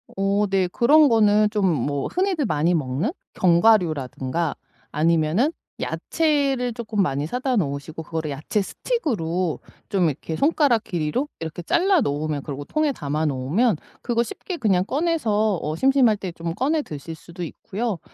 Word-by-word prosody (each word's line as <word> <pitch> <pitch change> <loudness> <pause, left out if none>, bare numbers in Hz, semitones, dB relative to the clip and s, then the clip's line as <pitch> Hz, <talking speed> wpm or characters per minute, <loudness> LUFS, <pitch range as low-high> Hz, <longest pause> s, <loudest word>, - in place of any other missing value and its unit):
어 195 +1 +1
네. 190 -1 +2
그런 285 +10 +5
거는 215 -2 +4
좀 210 -2 0 0.2
뭐 140 -1 -2
흔히들 365 -5 0
많이 160 -2 +1
먹는 150 - -1 0.2
견과류라든가 170 - +2 0.4
아니면은 165 - +2 0.3
야채를 280 -6 0
쪼끔 225 -3 -2
많이 145 -2 -1
사다 255 - -1
놓으시고 155 -3 -2
그거를 160 -1 -4
야채 155 +9 -1
스틱으로 185 - -2 0.3
좀 195 -4 +2
이렇게 160 +3 -5
손가락 280 - +2
길이로 175 - -1
이렇게 165 +1 -5
잘라 355 - +3
놓으면 150 -3 -1
그리고 145 -1 -6
통에 305 - 0
담아 150 - -2
놓으면 150 - +1 0.3
그거 235 -1 +1
쉽게 345 - -6
그냥 195 - +2
꺼내서 225 - +1
어 155 +1 -2
심심할 260 0 +4
때 190 -3 -5
좀 165 0 -5
꺼내 295 +8 +1
드실 155 - -7
수도 170 +2 -9
있고요. 205 +4 -4
195 Hz, 330 characters per minute, -23 LUFS, 160-250 Hz, 0.4 s, 그런